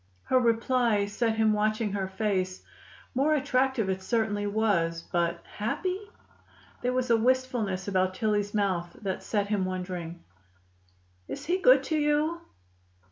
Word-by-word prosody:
Her 260 - +3
reply 235 -2 +2
set 220 +2 -1
him 220 -1 +3
watching 215 0 0
her 195 -1 -2
face. 190 -2 -2 0.5
More 285 +4 +2
attractive 265 -5 +1
it 190 0 -1
certainly 210 -1 0
was, 180 -6 +1
but 170 -1 -1
happy? 365 - -2 0.8
There 250 - 0
was 255 -1 0
a 230 - +6
wistfulness 235 -6 0
about 185 -1 +1
Tillie's 205 -1 0
mouth 185 -4 0
that 190 -2 -2
set 205 -2 -1
him 205 -3 +1
wondering. 180 -2 -5 1.0
"Is 285 - -6
he 360 +3 +1
good - - +6
to 315 - -1
you?" 300 +3 +1
215 Hz, 135 wpm, -28 LUFS, 190-255 Hz, 1.0 s, a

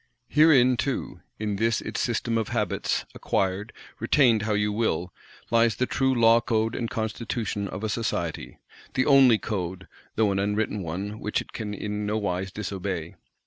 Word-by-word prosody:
Herein 135 -5 +5
too, 125 - -3 0.2
in 105 -2 -2
this 115 +2 +1
its - - -4
System 115 -1 -1
of 110 -2 0
Habits, 105 -5 -1
acquired, 95 +4 -1 0.3
retained 120 -7 +4
how 105 +1 -1
you 105 0 +1
will, 90 -5 -1 0.4
lies 115 -2 +4
the 125 - 0
true 130 0 +1
Law 115 0 +6
Code 110 -1 0
and 115 -2 -3
Constitution 110 -2 -3
of 100 +2 -6
a - - 0
Society; 85 - -3 0.4
the 130 - +2
only 135 -5 +6
Code, 95 -4 -4 0.3
though 105 -2 +3
an 95 - 0
unwritten 105 +1 -1
one 95 +6 -5
which 105 - -1
it - - -9
can 105 -2 -4
in 105 0 -3
nowise 95 -3 -1
_dis_obey. 95 -5 -4
105 Hz, 160 wpm, -26 LUFS, 100-115 Hz, 0.4 s, Law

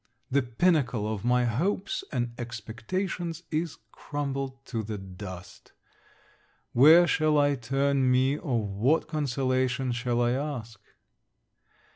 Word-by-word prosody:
The 140 +2 +3
pinnacle 125 - +1
of 110 -2 -3
my 125 0 +3
hopes 185 - -1
and 120 -3 -2
expectations 165 - -4
is 160 0 -2
crumbled 135 -2 -4
to 115 -4 -3
the 110 0 -5
dust. 95 -1 -10 1.0
Where 155 +8 +8
shall 155 -2 +2
I 145 0 +4
turn 135 +1 +1
me, 130 +2 +3
or 125 - -1
what 110 +11 +1
consolation 130 -3 0
shall 120 0 -1
I 120 0 +2
ask? 125 -6 -4
130 Hz, 115 wpm, -28 LUFS, 120-145 Hz, 1.0 s, Where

